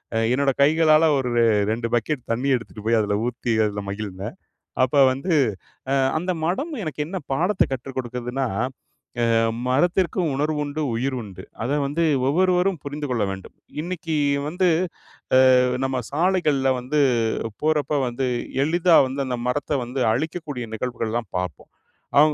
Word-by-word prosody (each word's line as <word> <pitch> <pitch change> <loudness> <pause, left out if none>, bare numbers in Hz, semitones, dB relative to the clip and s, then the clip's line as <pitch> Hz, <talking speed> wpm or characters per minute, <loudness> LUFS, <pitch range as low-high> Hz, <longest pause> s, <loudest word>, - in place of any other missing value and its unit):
அ - - +2 0.2
என்னோட 140 +1 +2
கைகளால 155 +2 +5
ஒரு 130 -2 -1
ரெ - - +5 0.3
2 115 +1 -2
பக்கெட் 125 +4 0
தண்ணி 120 +4 -1
எடுத்துட்டு 115 -3 -7
போயி 115 +1 +3
அதில 105 -1 0
ஊத்தி 120 -1 -3
அதில 105 -1 -3
மகிழ்ந்தேன். 100 -1 -5 0.5
அப்ப 130 +3 +1 0.2
வந்து 150 +7 -1 0.6
அ - - +3 0.2
அந்த 180 +4 -1
மரம் 265 - -1
எனக்கு 155 -3 -5
என்ன 190 +4 -4
பாடத்த 180 +8 +2
கற்று 135 +1 -5
கொடுக்கதுன்னா, 125 +1 -3 0.9
அ - - +3 0.3
மரத்திற்கும் 170 +4 +1
உணர்வுண்டு, 150 +1 -1
உயிர் 130 +3 -1
உண்டு. 95 -3 -10 0.2
அத 140 +5 0
வந்து 155 +4 0 0.2
ஒவ்வொருவரும் 180 +2 +2
புரிந்து 145 +1 -4
கொள்ள 115 -4 +1
வேண்டும். 95 0 -10 0.3
இன்னிக்கு 165 -2 -3 0.3
வந்து 180 +3 +1 0.9
அ - - +6 0.3
நம்ம 135 0 -1 0.2
சாலைகள்ல 150 -5 +2
வந்து 140 +5 0 0.6
போறப்ப 150 -1 +1
வந்து 125 +2 -2 0.4
எளிதா 170 +2 +4
வந்து 135 +2 -3
அந்த 125 -1 -2
மரத்த 145 +2 -1
வந்து 125 +3 -4
அழிக்கக்கூடிய 150 -2 -4
நிகழ்வுகள்லாம் 115 -1 -3
பாப்போம். 90 0 -6 0.5
அ - - +9
140 Hz, 140 wpm, -23 LUFS, 120-160 Hz, 0.9 s, அ